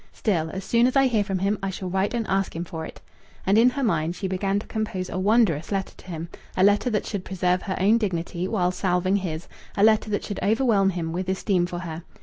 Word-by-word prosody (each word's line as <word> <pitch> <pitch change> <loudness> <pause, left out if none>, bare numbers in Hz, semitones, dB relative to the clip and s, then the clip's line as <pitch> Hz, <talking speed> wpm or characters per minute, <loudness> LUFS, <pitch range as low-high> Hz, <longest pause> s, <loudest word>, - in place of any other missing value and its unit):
Still, 170 -7 0
as 190 +3 -5
soon 235 +4 +3
as 255 - -1
I 270 0 +5
hear 225 -5 +2
from 195 -2 -2
him, 200 +3 0
I 195 - -1
shall 190 0 -5
write 190 +5 0
and 230 -2 -1
ask 195 -3 -1
him 170 +1 -3
for 160 -1 -6
it." - - -12 0.4
And 195 - +3
in 230 +3 +6
her 275 +2 -3
mind 170 -6 0
she 195 - -3
began 195 +1 0
to 205 - -4
compose 200 -4 -3
a 185 - -2
wondrous 195 -6 +2
letter 195 -1 -2
to - - -17
him 165 -2 -5 0.3
a 185 - +4
letter 205 +5 +4
that 210 -3 -1
should 200 -4 -4
preserve 180 -1 0
her 190 - -3
own 210 +5 +4
dignity 175 -3 -2
while 180 -4 +1
salving 185 +1 +1
his, 175 -4 -4 0.3
a 200 - +3
letter 220 0 +4
that 205 - -1
should 205 - -5
overwhelm 215 -3 +3
him 170 -3 -3
with 185 +1 -3
esteem 190 -2 +1
for 175 -1 -5
her. 165 -2 -6
190 Hz, 245 wpm, -25 LUFS, 180-210 Hz, 0.4 s, in